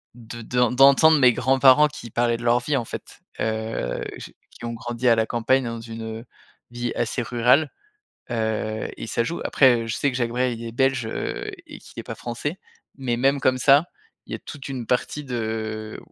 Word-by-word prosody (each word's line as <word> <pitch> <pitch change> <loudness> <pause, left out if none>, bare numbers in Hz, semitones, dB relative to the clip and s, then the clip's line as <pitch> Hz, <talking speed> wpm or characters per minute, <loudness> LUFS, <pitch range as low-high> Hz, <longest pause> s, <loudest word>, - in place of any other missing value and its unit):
de 115 0 -9
d 125 - -5
d'entendre 140 +4 +6
mes 125 -2 +6
grands-parents 135 +4 +5
qui 145 -7 -10
parlaient 120 -1 +1
de 120 - -9
leur 120 +1 +4
vie, 140 +3 0
en 120 - -2
fait, - - -9 0.2
heu, 110 - -2
j - - -10 0.2
qui - - -15
ont 115 - -3
grandi 120 +2 -3
à 115 - +6
la 110 0 +1
campagne 125 +3 +1
dans 115 -1 -5
une, 115 0 -8 0.2
heu, 120 - -13 0.5
vie 120 -1 -3
assez 120 +2 -1
rurale, 125 +6 +3 0.6
heu 110 -1 -2
et - - -6
ça 115 - 0
joue. 170 +8 -4
Après, 120 -4 +4
heu, - - -7
je 115 - -2
sais 140 - 0
que 125 - -4
Jacques 120 -2 0
Brel, 125 -1 0
il 115 - -7
est 115 - -5
belge, 130 -2 +1
heu, - - -4 0.2
et - - -10
qu'il - - -16
est - - -6
pas - - -6
français, 145 +9 -5 0.4
mais 125 -3 -1
même 135 +2 +2
comme 130 0 +2
ça, 140 +4 +5 0.4
il - - -8
y - - 0
a - - -8
toute 145 -2 -9
une 125 -3 -4
partie 135 +4 -1
de, 110 -3 -4
120 Hz, 210 wpm, -23 LUFS, 115-135 Hz, 0.6 s, d'entendre